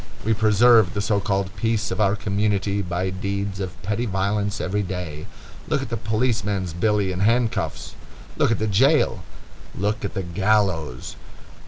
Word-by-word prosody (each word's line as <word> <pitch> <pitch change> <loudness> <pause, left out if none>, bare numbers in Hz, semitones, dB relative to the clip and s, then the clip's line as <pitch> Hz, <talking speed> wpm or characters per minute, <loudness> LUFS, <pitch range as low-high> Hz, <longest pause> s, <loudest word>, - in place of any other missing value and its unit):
We 110 - +3
preserve 110 -2 +4
the - - -1
so 105 0 +1
called 95 0 -2
peace 110 0 -1
of 95 +3 -1
our 100 -1 +3
community 100 -1 0
by 90 0 -2
deeds 100 +1 -3
of 90 -3 -5
petty 105 +5 -1
violence 100 +1 -1
every 105 +3 -1
day. 90 -5 -5 0.4
Look - - 0
at - - -7
the 115 - -2
policeman's 110 -5 -1
billy 100 +2 +1
and 90 +1 -3
handcuffs! 115 +2 0 0.4
Look - - +2
at 115 - +1
the 110 - -1
jail! 115 0 +3 0.6
Look 105 +3 -1
at 100 - -4
the 95 - -2
gallows! 90 -7 0
100 Hz, 160 wpm, -23 LUFS, 95-110 Hz, 0.6 s, preserve